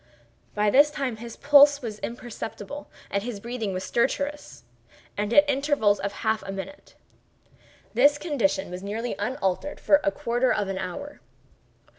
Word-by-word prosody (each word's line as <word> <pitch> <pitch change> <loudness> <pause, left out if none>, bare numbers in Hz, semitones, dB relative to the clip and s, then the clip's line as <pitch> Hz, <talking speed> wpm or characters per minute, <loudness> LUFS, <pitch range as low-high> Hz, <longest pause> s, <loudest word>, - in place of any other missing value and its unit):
By 210 0 +2
this 290 +5 +6
time 270 -6 -3
his 235 +1 -8
pulse 285 0 +6
was 215 -3 -5
imperceptible 240 +3 -7 0.2
and 200 - 0
his 225 -1 -5
breathing 230 -2 -4
was 185 0 -4
stertorous, 285 +4 -2 0.5
and 205 +1 -2
at 290 +4 +6
intervals 275 -7 +2
of 200 0 -2
half 220 0 +1
a 195 - -6
minute. 195 +9 -8 1.0
This 290 +1 +5
condition 235 - -1
was 180 +1 -6
nearly 220 +5 -3
unaltered 260 +1 -2
for 295 0 +4
a 300 - +3
quarter 250 -3 0
of 205 -2 0
an 190 -1 -3
hour. 190 +11 -6
235 Hz, 150 wpm, -25 LUFS, 205-285 Hz, 1.0 s, this